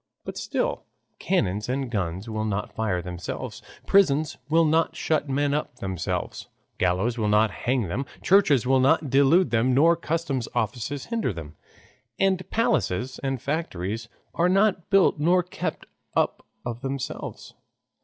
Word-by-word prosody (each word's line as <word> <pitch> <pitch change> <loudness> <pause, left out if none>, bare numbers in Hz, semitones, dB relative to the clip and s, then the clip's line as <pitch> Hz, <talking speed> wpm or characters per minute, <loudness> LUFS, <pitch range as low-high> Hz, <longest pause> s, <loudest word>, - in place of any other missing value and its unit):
But - - -6
still - - -2 0.3
cannons 105 - 0
and 130 -1 -2
guns 95 -1 -2
will 110 -1 -2
not 105 -1 -2
fire 95 -6 -1
themselves, 90 -1 -6 0.2
prisons 155 -6 +3
will 165 +1 +4
not 160 +1 +2
shut 155 -2 0
men 140 +1 +1
up 150 -3 -2
of - - -24
themselves, 95 -3 -3 0.3
gallows 95 +7 +1
will 105 - +1
not 105 +1 +3
hang 125 -1 0
them, 120 +9 -3 0.2
churches 155 - +4
will 130 +1 +4
not 135 +1 +3
delude 140 +3 +4
them, 120 +2 +2
nor 165 +5 +5
customs 160 -6 -2
offices 130 +4 -2
hinder 225 - 0
them, 80 -4 -8 0.6
and 190 -1 +1
palaces 130 - 0
and 135 -3 -3
factories 115 - -3 0.2
are 175 +1 +2
not 195 -1 +2
built 195 -6 +4
nor 175 +4 +3
kept 180 - -5 0.3
up - - 0 0.2
of 120 0 -4
themselves. 135 0 -5
135 Hz, 145 wpm, -25 LUFS, 110-165 Hz, 0.6 s, nor